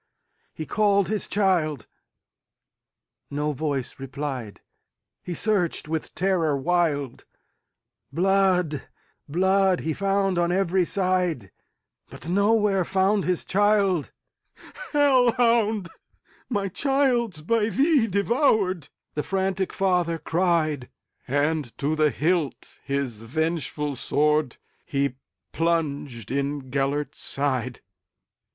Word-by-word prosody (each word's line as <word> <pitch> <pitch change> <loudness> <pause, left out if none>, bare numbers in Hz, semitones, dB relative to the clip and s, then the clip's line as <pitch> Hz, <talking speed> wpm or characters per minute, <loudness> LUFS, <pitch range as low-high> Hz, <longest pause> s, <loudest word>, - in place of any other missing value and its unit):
He 155 - -6
called 200 -1 +2
his 215 -1 -1
child,—no 170 - +1 1.7
voice 140 -3 -3
replied,—He 135 - -8
searched 200 -7 +1
with 160 0 -4
terror 170 -4 +1
wild; 145 -3 0 0.9
Blood, 180 -5 +1 0.4
blood, 190 +3 +2
he 160 - -1
found 195 0 0
on 170 0 +1
every 185 -1 +2
side, 180 - 0 0.6
But - - -10
nowhere 200 +1 +2
found 195 +2 +1
his 180 -2 -1
child."Hell 215 - 0
hound! 225 -5 +2 0.6
my 205 -5 -1
child 255 -1 +1
's 155 - -10
by 220 +6 +1
thee 270 - +3
devoured,"The 200 - 0
frantic 190 +1 -1
father 180 -3 +1
cried; 160 -5 0 0.4
And 145 -1 -1
to 150 +3 0
the 155 -1 +3
hilt 160 -1 -2
his 140 -6 -3
vengeful 150 +3 -2
swordHe 140 -1 -1 0.4
plunged 145 - -2
in 140 -1 -2
Gêlert's 140 +2 -1
side. 130 -3 -2
175 Hz, 90 wpm, -25 LUFS, 145-195 Hz, 1.7 s, thee